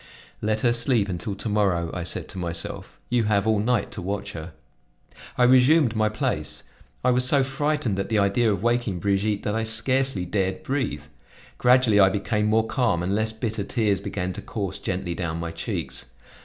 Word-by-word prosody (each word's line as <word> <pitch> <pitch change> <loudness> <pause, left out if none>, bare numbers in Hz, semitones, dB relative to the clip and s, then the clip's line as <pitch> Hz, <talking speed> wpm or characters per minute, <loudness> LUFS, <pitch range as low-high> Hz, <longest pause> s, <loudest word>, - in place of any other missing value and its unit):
"Let 110 0 0
her 120 -1 +3
sleep 115 -3 +2
until 95 +3 -3
to 105 - -3
morrow," 95 -6 +1
I 90 - -3
said 85 - -3
to 95 - -7
myself; 85 -1 -5
"you 120 -2 +2
have 100 -1 +2
all 110 -2 +2
night 115 +1 0
to - - -6
watch 100 +2 -3
her." 80 -1 -8 0.8
I 125 - +4
resumed 130 +1 +5
my 110 0 +2
place; 110 - -3 0.4
I 125 - +5
was 125 0 +2
so 135 +2 +4
frightened 135 -5 -1
at 100 - -3
the 110 - +1
idea 105 +3 +2
of 100 -1 -2
waking 120 -5 +1
Brigitte, 100 +3 0
that 105 - -1
I 115 - 0
scarcely 115 -1 0
dared 95 0 -1
breathe. 130 - -2 0.6
Gradually 125 -4 +5
I 95 -1 +7
became 105 +2 -1
more 110 +1 +3
calm 110 -8 0
and 95 +2 -1
less 110 +1 0
bitter 110 -1 -3
tears 105 -2 0
began 90 -1 -3
to - - -7
course 100 -3 -4
gently 90 -1 -3
down 85 -1 -3
my 85 0 -4
cheeks. 80 -5 -5
105 Hz, 190 wpm, -24 LUFS, 95-120 Hz, 0.8 s, I